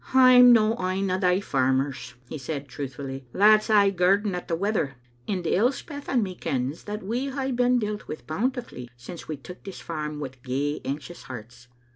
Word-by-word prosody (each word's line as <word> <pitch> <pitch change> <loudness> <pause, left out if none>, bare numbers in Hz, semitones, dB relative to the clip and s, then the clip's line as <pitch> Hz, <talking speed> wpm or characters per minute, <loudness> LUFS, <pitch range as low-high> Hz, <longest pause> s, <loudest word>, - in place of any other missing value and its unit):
"I'm 250 -1 +8
no 225 -1 +4
ane 185 +1 0
o' 185 - 0
thae 180 -1 +3
farmers," 130 -4 0
he 155 - -6
said, 140 0 -5
truthfillly, 135 -1 -6
"that's 215 +2 +5
aye 205 -2 +5
girding 195 +2 +2
at 180 - -5
the 165 - 0
weather, 185 -7 -1 0.3
and 185 -4 -2
Elspeth 270 - 0
and 245 -4 +2
me 190 -2 -4
kens 135 -2 -3
that 210 0 -5
we 245 +7 -2
hae 270 0 -2
been 250 0 +3
dealt 210 -2 -3
wi* 155 - -5
bountifully 220 - -3
since 165 +8 -9
we 155 - -4
took 180 +7 -11
this 195 - -8
farm 150 -2 -5
wi' 140 -3 -4
gey 140 +3 -2
anxious 150 +3 -5
hearts. 120 0 -10
180 Hz, 180 wpm, -26 LUFS, 140-215 Hz, 0.3 s, I'm